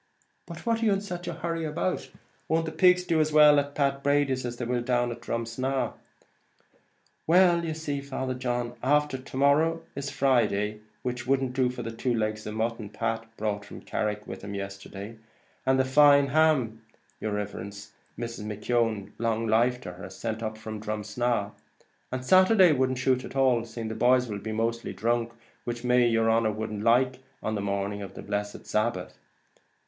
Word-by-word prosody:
"But 170 Hz, -1 st, -9 dB
what 230 Hz, -1 st, +1 dB
are -, -, +1 dB
you 205 Hz, -, +4 dB
in 195 Hz, -, -1 dB
such 175 Hz, -3 st, -6 dB
a 170 Hz, -, -2 dB
hurry 165 Hz, 0 st, -3 dB
about? 160 Hz, +4 st, -2 dB, 0.4 s
Won't 165 Hz, +1 st, +1 dB
the 160 Hz, -, -4 dB
pigs 180 Hz, +2 st, +4 dB
do 165 Hz, -3 st, +2 dB
as 155 Hz, 0 st, +1 dB
well 150 Hz, -1 st, +7 dB
at 145 Hz, 0 st, -4 dB
Pat 140 Hz, -1 st, +1 dB
Brady's 140 Hz, -3 st, +1 dB
as 120 Hz, 0 st, -6 dB
they 120 Hz, -, -3 dB
will 120 Hz, 0 st, 0 dB
down 120 Hz, 0 st, +1 dB
at 120 Hz, 0 st, -7 dB
Drumsna?" 120 Hz, +3 st, -2 dB, 1.3 s
"Why 175 Hz, +1 st, +5 dB
you 165 Hz, -2 st, -3 dB
see, 145 Hz, -3 st, -3 dB
Father 130 Hz, -2 st, -3 dB
John, 120 Hz, -1 st, -2 dB
after 145 Hz, 0 st, +2 dB
to 130 Hz, 0 st, -9 dB
morrow 155 Hz, +4 st, +3 dB
is 140 Hz, 0 st, -3 dB
Friday, 110 Hz, -7 st, +1 dB, 0.2 s
which 125 Hz, -1 st, -3 dB
wouldn't 135 Hz, -1 st, +1 dB
do 130 Hz, -1 st, +2 dB
for 125 Hz, -, -6 dB
the 115 Hz, -, -4 dB
two 120 Hz, +2 st, -1 dB
legs 110 Hz, -1 st, -2 dB
of 105 Hz, -, -5 dB
mutton 110 Hz, -1 st, -2 dB
Pat 115 Hz, +1 st, -3 dB
brought 105 Hz, -1 st, -2 dB
from 100 Hz, -, -10 dB
Carrick 105 Hz, 0 st, -2 dB
with 95 Hz, -, -7 dB
him 100 Hz, 0 st, -5 dB
yesterday, 100 Hz, +2 st, -7 dB, 0.5 s
and 130 Hz, 0 st, +4 dB
the 130 Hz, -, +3 dB
fine 140 Hz, +1 st, +6 dB
ham, 135 Hz, -7 st, +2 dB, 0.4 s
yer 110 Hz, -, -2 dB
riverence, 100 Hz, 0 st, -5 dB, 0.3 s
Mrs. 115 Hz, -2 st, -5 dB
McKeon, 105 Hz, -1 st, -1 dB
long 115 Hz, 0 st, 0 dB
life 120 Hz, +3 st, +2 dB
to 90 Hz, -, -6 dB
her, 90 Hz, -, -11 dB
has -, -, -10 dB
sent 110 Hz, -1 st, -4 dB
us 110 Hz, -, -1 dB
up -, -, -14 dB
from 110 Hz, -1 st, -6 dB
Drumsna; 105 Hz, +1 st, -1 dB, 0.6 s
and 130 Hz, 0 st, -4 dB
Saturday 185 Hz, +1 st, +6 dB
wouldn't 130 Hz, -2 st, +1 dB
shute 130 Hz, 0 st, +1 dB
at -, -, -9 dB
all, 130 Hz, -4 st, +3 dB
seeing 115 Hz, -1 st, -6 dB
the -, -, -3 dB
boys 125 Hz, +2 st, +3 dB
will 105 Hz, -2 st, -5 dB
mostly 115 Hz, +2 st, -2 dB
be -, -, -19 dB
dhrunk, 115 Hz, 0 st, 0 dB, 0.3 s
which 120 Hz, 0 st, -4 dB
may 125 Hz, 0 st, +3 dB
be -, -, +3 dB
yer 115 Hz, -1 st, +2 dB
honer 115 Hz, -1 st, +3 dB
wouldn't 105 Hz, -1 st, -4 dB
like 125 Hz, +3 st, +3 dB, 0.2 s
on 110 Hz, -, -1 dB
the 105 Hz, -, -2 dB
morning 100 Hz, 0 st, -2 dB
of 100 Hz, -, -8 dB
the -, -, -8 dB
blessed 105 Hz, 0 st, -4 dB
Sabbath." 105 Hz, -4 st, -1 dB
120 Hz, 190 wpm, -27 LUFS, 110-140 Hz, 1.3 s, well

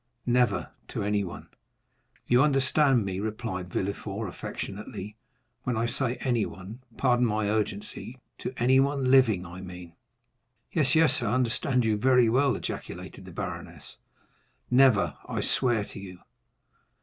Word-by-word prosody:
"Never, 120 Hz, -4 st, +1 dB, 0.2 s
to -, -, -4 dB
anyone." 100 Hz, -3 st, -2 dB, 0.8 s
"You 120 Hz, +1 st, +4 dB
understand 135 Hz, -3 st, +3 dB
me," 95 Hz, -1 st, -3 dB
replied 105 Hz, -4 st, -4 dB
Villefort, 100 Hz, +3 st, -3 dB
affectionately; 100 Hz, +3 st, -6 dB, 0.5 s
"when 125 Hz, -2 st, -2 dB
I 115 Hz, -, +1 dB
say 125 Hz, +1 st, 0 dB
anyone,—pardon 120 Hz, +1 st, -1 dB
my 110 Hz, -3 st, +1 dB
urgency,—to 110 Hz, +4 st, -4 dB
anyone 130 Hz, +2 st, +3 dB
living 115 Hz, -9 st, +4 dB
I 90 Hz, +2 st, -9 dB
mean?" 90 Hz, -2 st, -9 dB, 0.8 s
"Yes, 145 Hz, -4 st, +2 dB
yes, 160 Hz, -4 st, +4 dB
I 120 Hz, -, -1 dB
understand 125 Hz, +1 st, +1 dB, 0.2 s
very 125 Hz, -2 st, +5 dB
well," 130 Hz, +2 st, +3 dB
ejaculated -, -, -6 dB
the -, -, -10 dB
baroness; -, -, -7 dB, 0.7 s
"never, 125 Hz, -5 st, +4 dB
I -, -, -1 dB
swear 120 Hz, -5 st, +1 dB
to -, -, -9 dB
you." 95 Hz, -2 st, -9 dB
120 Hz, 115 wpm, -27 LUFS, 100-130 Hz, 0.8 s, very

